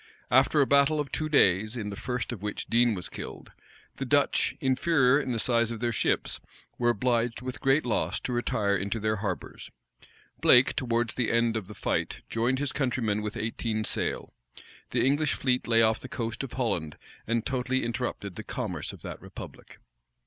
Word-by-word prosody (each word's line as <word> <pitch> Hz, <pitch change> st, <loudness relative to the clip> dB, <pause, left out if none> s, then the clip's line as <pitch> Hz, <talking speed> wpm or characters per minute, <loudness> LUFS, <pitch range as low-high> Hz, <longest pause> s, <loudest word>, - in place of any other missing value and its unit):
After 135 Hz, +4 st, +5 dB
a -, -, +5 dB
battle 140 Hz, +3 st, +4 dB
of 145 Hz, -2 st, -3 dB
two 155 Hz, -1 st, -2 dB
days, 110 Hz, -4 st, +3 dB
in 105 Hz, -3 st, -4 dB
the -, -, -5 dB
first 125 Hz, +4 st, -3 dB
of 115 Hz, -6 st, -6 dB
which 105 Hz, 0 st, -4 dB
Dean 120 Hz, -1 st, +3 dB
was 90 Hz, -, -5 dB
killed, -, -, -8 dB, 0.5 s
the -, -, -3 dB
Dutch, -, -, +2 dB
inferior 135 Hz, 0 st, +3 dB
in 130 Hz, -, -3 dB
the 120 Hz, -, -1 dB
size 115 Hz, 0 st, +2 dB
of 115 Hz, -2 st, -5 dB
their 120 Hz, +1 st, 0 dB
ships, 115 Hz, -, 0 dB, 0.4 s
were 120 Hz, -1 st, +3 dB
obliged, 120 Hz, +1 st, 0 dB
with 130 Hz, +2 st, -6 dB
great 135 Hz, +2 st, +3 dB
loss, 105 Hz, -4 st, 0 dB
to 125 Hz, -, -3 dB
retire 105 Hz, -4 st, +1 dB
into 100 Hz, +3 st, -2 dB
their 110 Hz, 0 st, 0 dB
harbors. 100 Hz, -4 st, -5 dB, 0.7 s
Blake, 125 Hz, +1 st, +6 dB
towards 120 Hz, -2 st, 0 dB
the 120 Hz, -3 st, 0 dB
end 115 Hz, -1 st, +2 dB
of 110 Hz, -5 st, -3 dB
the 105 Hz, -, -10 dB
fight, -, -, -2 dB
joined 120 Hz, +3 st, +1 dB
his 145 Hz, 0 st, -1 dB
countrymen 120 Hz, -6 st, 0 dB
with 105 Hz, 0 st, -4 dB
eighteen 110 Hz, 0 st, -2 dB
sail. -, -, -2 dB, 0.6 s
The -, -, +1 dB
English 145 Hz, +2 st, +2 dB
fleet 125 Hz, -1 st, 0 dB
lay 115 Hz, -1 st, +4 dB
off 110 Hz, 0 st, +3 dB
the 130 Hz, -, -9 dB
coast 115 Hz, 0 st, -3 dB
of 135 Hz, -, -7 dB
Holland, 95 Hz, -, -2 dB, 0.3 s
and 115 Hz, 0 st, 0 dB
totally 130 Hz, 0 st, 0 dB
interrupted 115 Hz, -5 st, -3 dB
the -, -, -5 dB
commerce -, -, -4 dB
of -, -, -13 dB
that -, -, -7 dB
republic. -, -, -11 dB
120 Hz, 185 wpm, -28 LUFS, 110-130 Hz, 0.7 s, Blake